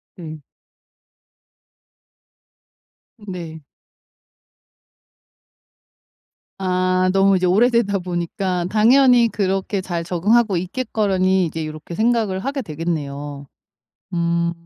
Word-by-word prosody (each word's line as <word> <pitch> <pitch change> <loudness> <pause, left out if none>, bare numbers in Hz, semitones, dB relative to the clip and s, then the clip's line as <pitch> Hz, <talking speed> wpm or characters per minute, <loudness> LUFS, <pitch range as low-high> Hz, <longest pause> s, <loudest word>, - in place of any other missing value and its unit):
네. 155 -4 -9 2.8
네. 175 -6 -8 3.0
아 185 -1 +1
너무 195 0 +4
이제 185 - 0
오래되다 205 +1 +2
보니까 180 0 -3
당연히 240 +2 +5
그렇게 195 0 -1
잘 170 -2 -4
적응하고 195 +4 +2
있겠거니 190 -2 0
이제 160 0 -4
요렇게 155 +2 -8
생각을 220 -4 +1
하게 275 +5 -3
되겠네요. 145 - -5 0.7
음. 170 0 0
185 Hz, 180 characters per minute, -20 LUFS, 170-210 Hz, 3.0 s, 당연히